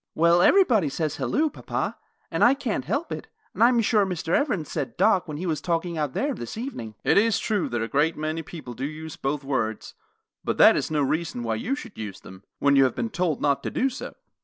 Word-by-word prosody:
"Well, 170 +2 +4
everybody 235 - +4
says 155 +2 -2
'Halloo,' 310 +1 0
papa, - - -3 0.4
and - - +1
I 250 +3 +6
can't 250 -6 -3
help 305 +5 -2
it, - - -5 0.3
and - - +2
I'm 240 0 +5
sure 215 -1 +3
Mr. 180 -4 -3
Evans 260 - 0
said 145 -5 -4
'Doc' 195 -5 +3
when 150 -2 -5
he 180 - -4
was 155 -4 -1
talking 170 0 -1
out 150 -4 -2
there 285 +1 0
this 120 - -7
evening." 170 - -6
"It - - +5
is 225 +1 +2
true 210 -6 -1
that 120 -1 -1
a - - -2
great 150 +6 +1
many 155 +1 -2
people 150 -6 -9
do 130 +3 -4
use 155 +1 -8
both 140 +1 -2
those 135 - -15
words, 110 -6 -2 0.5
but - - -1
that - - +8
is - - -1
no 150 -2 +1
reason 145 -3 -1
why 115 -1 -1
you 235 - -1
should 230 - -10
use 105 -3 -6
them, 95 +1 -13
when 140 0 +3
you 135 - +6
have 130 - -1
been 230 - -2
told 175 -6 -1
not 140 -1 +2
to - - -3
do 265 +1 0
so. 255 - -7
165 Hz, 235 wpm, -25 LUFS, 140-220 Hz, 0.5 s, that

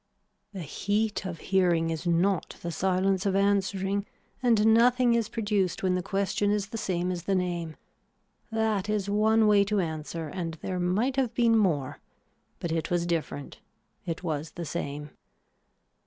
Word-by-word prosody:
The 190 -4 -6
heat 205 +5 -1
of 175 -2 -5 0.2
hearing 170 -3 +3
is 165 +2 -4
not 175 +2 +1
the 170 - -3
silence 190 +3 +1
of 195 - +1
answering 195 0 +1 0.3
and 225 -3 +4
nothing 245 +1 +4
is 230 -2 +1
produced 205 -6 -1
when 185 -1 +2
the 180 - 0
question 195 +2 0
is 205 0 0
the 225 - -5
same 180 -3 -1
as 175 -1 -5
the 195 - +1
name. 175 -3 -2 0.8
That 220 -3 0
is 205 -2 -1
one 220 +2 +4
way 205 -1 +5
to 205 0 0
answer 160 -1 -3
and 165 0 -4
there 180 +3 -4
might 210 +10 0
have 250 -4 0
been 230 -2 +4
more 165 -11 +1 0.6
but 170 - -3
it 165 -1 -1
was 175 -1 +1
different, 160 -4 -3 0.4
it 165 +1 -4
was 155 -2 -3
the 170 - -5
same. 150 -2 -5
190 Hz, 160 wpm, -28 LUFS, 170-210 Hz, 0.8 s, way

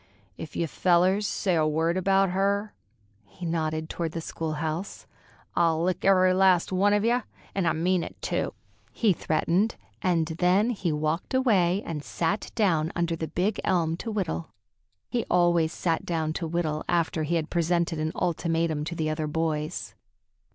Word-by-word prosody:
"If 155 - -9
you 170 - 0
fellers 185 +5 +2
say 190 -4 0
a 155 -2 +3
word 160 +3 +1
about 195 0 +2
her"—he 120 - -4
nodded 155 -1 -1
toward 165 -1 -3
the 165 - -3
school 160 -1 -4
house—"I'll 165 0 -3
lick 180 0 -1
every 185 -1 +5
last 185 -2 +4
one 200 +2 +3
of 205 +1 +2
yeh, 240 +2 +3 0.3
an' 190 -3 0
I - - +3
mean 175 +2 +1
it, - - -9
too!" - - -2 0.4
he 215 -5 +2
threatened, 175 +7 0 0.3
and 170 -3 +2
then 180 +7 +2
he 195 -7 -1
walked 155 +9 -1
away 200 -7 +3
and 150 -3 -4
sat 175 +8 -2
down 170 -7 +2
under 170 -1 0
the 160 -1 -4
big 185 +7 -1
elm 165 -3 +1
to 225 - -5
whittle. 185 -6 -2 0.6
He 240 -2 -1
always 175 -2 +3
sat 165 -2 -1
down 160 -2 -1
to 165 - -3
whittle 160 -2 -1
after 170 -2 +1
he 155 +3 0
had 160 -2 -2
presented 170 -1 +1
an 155 +1 -1
ultimatum 165 -3 0
to 170 - -4
the 155 -2 -1
other 155 0 -2
boys. 155 0 -2
170 Hz, 165 wpm, -27 LUFS, 160-185 Hz, 0.6 s, every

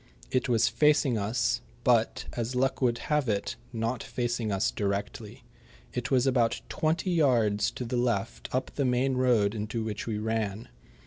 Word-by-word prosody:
It 130 0 0
was 115 -2 +4
facing 150 -4 +3
us, 100 - 0 0.2
but, - - +2
as 120 +1 -3
luck 135 +2 +1
would 120 -2 +2 0.2
have 150 -5 +2
it, 100 -1 -1 0.2
not 115 +1 -2
facing 120 -3 -2
us 100 +3 +1
directly. 105 +4 -4 0.5
It 125 0 -3
was 130 -2 +3
about 125 -4 +2
twenty 160 +4 0
yards 115 -10 +3
to 125 - -6
the 120 +1 -2
left 100 - -1
up 130 +1 -1
the 140 - -1
main 130 +1 +2
road 120 -5 +3
into 110 +1 -3
which 110 0 -4
we 110 -2 -1
ran. 110 - -2
120 Hz, 165 wpm, -28 LUFS, 105-130 Hz, 0.5 s, was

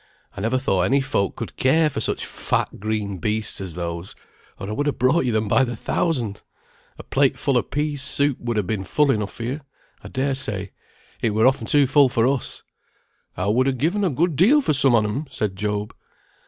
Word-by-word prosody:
I 100 - -6
never 115 +5 +1
thought 95 -8 +1
any 130 +10 +3
folk 130 -7 -1
could - - -7
care 155 +5 +3
for 150 - -3
such - - -1
fat - - -2
green 105 -2 -3
beasts 105 +1 -1
as 95 -4 -6
those, 85 +1 -5 0.4
or 95 - -6
I - - -4
would 145 +7 -1
ha' 145 - -1
brought 130 +5 +2
you 125 - +1
them 110 -1 0
by 135 - +4
the 120 -2 -3
thousand. 120 - -1 0.6
A - - -9
plate 135 -1 +1
full 140 -3 0
o' 125 - +4
peas 145 -1 -2
soup 140 0 +1
would 120 -2 -3
ha' 105 - +1
been 100 0 -2
full 145 +8 +2
enough 105 -4 -2
for 115 - -7
you, 130 +6 -3 0.4
I - - -8
dare 135 +1 -1
say; 100 -7 -4 0.5
it 110 -2 0
were 110 +2 +3
often 130 -3 +2
too 145 -1 +4
full 140 0 +4
for 120 -2 +2
us." 135 -1 -2 0.7
"I 90 - -1
would 120 +6 +2
ha' 135 -1 0
given 175 - 0
a 190 - +2
good 160 +3 0
deal 225 - +5
for 210 - +1
some 135 -3 +5
on 110 -2 +3
'em," 110 +9 -3
said 105 -3 -3
Job. 105 +1 -3
125 Hz, 220 wpm, -22 LUFS, 105-140 Hz, 0.7 s, deal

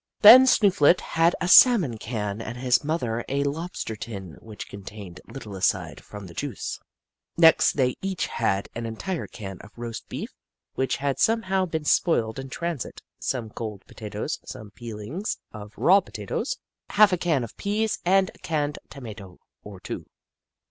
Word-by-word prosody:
Then 250 +5 +10
Snooflet 190 - +5
had 165 +2 +2
a - - -1
salmon 180 - +7
can 105 -2 -4
and 115 +2 -6
his 125 +1 +2
mother 125 -7 -1
a 140 +1 0
lobster 145 -5 -4
tin 100 -6 -7
which 110 -2 -9
contained 100 -2 -10
little 110 -7 -9
aside 95 - -1
from 105 -1 -10
the 85 - -11
juice. 140 -2 -4 0.6
Next 165 -1 +6
they 130 -3 +1
each 190 -2 -2
had 100 -4 -1
an 115 0 -4
entire 160 - -4
can 95 -5 -8
of 105 +4 -16
roast 115 -1 -7
beef, - - -6 0.4
which 130 - 0
had 140 -2 -2
somehow 195 -4 +2
been 160 -2 -3
spoiled 115 -9 +2
in 135 0 -7
transit, 170 -1 -5 0.2
some 115 -5 -3
cold 105 -4 -6
potatoes, 105 -1 -5
some 105 -2 -9
peelings 120 - -5
of 105 -1 -9
raw 190 +3 +6
potatoes, - - -4 0.3
half 210 -2 +5
a - - +2
can 155 -8 +1
of 115 - -8
peas, 215 +2 -1
and 190 +1 +3
a - - -21
canned 150 -2 -2
tomato 105 -8 -10 0.2
or 100 -2 -11
two. - - -7
130 Hz, 160 wpm, -25 LUFS, 110-175 Hz, 0.6 s, Then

